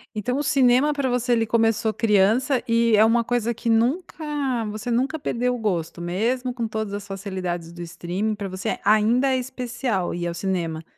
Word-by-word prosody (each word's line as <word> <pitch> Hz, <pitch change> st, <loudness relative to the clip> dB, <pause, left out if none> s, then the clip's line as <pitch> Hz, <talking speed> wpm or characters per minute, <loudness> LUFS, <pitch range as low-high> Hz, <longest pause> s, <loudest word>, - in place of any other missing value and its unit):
Então 245 Hz, +5 st, -1 dB
o 290 Hz, -, -1 dB
cinema 270 Hz, +1 st, +3 dB
pra 280 Hz, -2 st, -1 dB
você 245 Hz, 0 st, +1 dB
ele 225 Hz, -1 st, +2 dB
começou 225 Hz, -1 st, +1 dB
criança, 225 Hz, +5 st, +2 dB
e 230 Hz, -1 st, +3 dB
é 215 Hz, +1 st, +6 dB
uma 235 Hz, +1 st, +3 dB
coisa 235 Hz, 0 st, 0 dB
que 230 Hz, +1 st, -4 dB
nunca 245 Hz, +11 st, +1 dB, 0.6 s
você 215 Hz, +3 st, -5 dB
nunca 265 Hz, +7 st, 0 dB
perdeu 250 Hz, -2 st, -1 dB
o -, -, -4 dB
gosto? 175 Hz, -6 st, -2 dB
Mesmo 230 Hz, +9 st, -1 dB
com 235 Hz, -2 st, -3 dB
todas 220 Hz, -2 st, -4 dB
as 205 Hz, -1 st, -5 dB
facilidades 185 Hz, -4 st, -4 dB
do 175 Hz, 0 st, -10 dB
streaming 175 Hz, +5 st, -3 dB
pra 205 Hz, -1 st, -5 dB
você 185 Hz, +1 st, -3 dB
ainda 220 Hz, +5 st, +3 dB
é 260 Hz, -, +2 dB
especial 245 Hz, -6 st, -3 dB
ir 175 Hz, 0 st, -3 dB
ao 170 Hz, -, -3 dB
cinema? 170 Hz, -3 st, -2 dB
225 Hz, 185 wpm, -23 LUFS, 195-245 Hz, 0.6 s, é